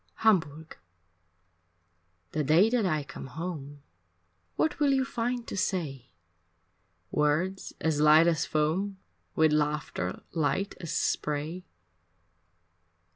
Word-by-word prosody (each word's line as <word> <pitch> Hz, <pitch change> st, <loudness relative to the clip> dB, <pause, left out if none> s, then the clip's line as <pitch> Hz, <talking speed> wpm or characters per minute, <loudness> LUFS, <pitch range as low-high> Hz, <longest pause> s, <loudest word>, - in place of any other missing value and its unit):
XI -, -, -39 dB
Hamburg 160 Hz, -7 st, +1 dB, 1.5 s
The 155 Hz, -, -1 dB
day 170 Hz, +10 st, +4 dB
that 235 Hz, -5 st, +2 dB
I 155 Hz, -4 st, 0 dB
come 135 Hz, -1 st, -9 dB
home, 145 Hz, -1 st, -6 dB, 0.7 s
What 155 Hz, -, 0 dB
will 290 Hz, -2 st, +3 dB
you 265 Hz, -1 st, +2 dB
find 245 Hz, -2 st, -2 dB
to -, -, -6 dB
say, 160 Hz, -10 st, -2 dB, 1.0 s
Words 155 Hz, +6 st, 0 dB
as 155 Hz, -2 st, 0 dB
light 155 Hz, +2 st, +7 dB
as 165 Hz, -2 st, +2 dB
foam 175 Hz, +6 st, 0 dB, 0.4 s
With 160 Hz, -1 st, +4 dB
laughter 150 Hz, -11 st, -1 dB
light 160 Hz, +5 st, 0 dB
as 165 Hz, -2 st, -5 dB
spray? 150 Hz, +5 st, -1 dB
160 Hz, 110 wpm, -28 LUFS, 150-190 Hz, 1.5 s, light